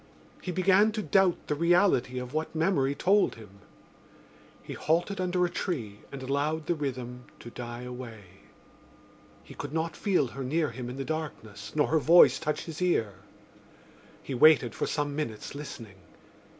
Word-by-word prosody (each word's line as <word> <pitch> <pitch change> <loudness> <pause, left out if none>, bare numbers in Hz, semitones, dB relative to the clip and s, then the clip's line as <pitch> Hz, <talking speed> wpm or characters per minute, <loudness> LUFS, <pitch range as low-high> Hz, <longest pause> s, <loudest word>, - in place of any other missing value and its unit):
He 180 - -4
began 190 +4 +4
to 215 -1 -3
doubt 190 -3 +3
the - - -1
reality 170 -5 +2
of 125 +1 -5
what 155 +1 -3
memory 160 -5 +1
told 200 +6 +3
him. 105 -3 -14 1.0
He - - -7
halted 175 +5 0
under 180 0 +1
a - - -1
tree 120 - -4
and 135 -1 -7
allowed 145 +4 -1
the - - +1
rhythm 125 -5 -5
to 120 - -10
die 120 0 -7
away. 125 -4 -8 1.2
He - - -13
could 145 0 -7
not 160 0 -2
feel 180 - +1
her 135 +3 -6
near 150 +2 0
him 120 0 -6
in 125 - -7
the 135 - -4
darkness 125 -10 -6
nor 150 - +3
her 160 - +3
voice 170 +4 +6
touch 150 -1 -2
his 165 +1 -8
ear. 115 - +1 1.1
He 140 - -5
waited 130 -3 +5
for - - -2
some 145 -1 -2
minutes 115 -8 -4
listening. 115 -8 -9
150 Hz, 165 wpm, -28 LUFS, 125-170 Hz, 1.2 s, voice